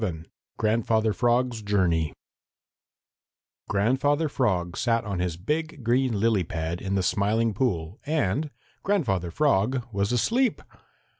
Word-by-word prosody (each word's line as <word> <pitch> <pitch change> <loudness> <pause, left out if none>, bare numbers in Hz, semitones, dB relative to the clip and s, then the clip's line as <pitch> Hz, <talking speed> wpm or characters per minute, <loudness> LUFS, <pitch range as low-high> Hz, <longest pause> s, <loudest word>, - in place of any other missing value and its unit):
XI 80 -6 -3 0.3
GRANDFATHER 110 0 +1
FROG'S 120 -1 +1
JOURNEY 90 -7 +1 1.6
Grandfather 135 +9 +2
Frog 90 -11 0
sat 115 -1 +1
on 100 -3 -3
his 90 -2 -2
big 150 - -3
green 120 -1 +1
lily 110 -3 +2
pad 80 +1 -4
in 100 -1 -2
the 95 - +1
Smiling 110 +4 +1
Pool 95 -5 -1
and 150 -1 0 0.3
Grandfather 115 - 0
Frog 125 - +1
was 100 +2 0
asleep! 230 - +1
110 Hz, 120 wpm, -26 LUFS, 95-130 Hz, 1.6 s, Grandfather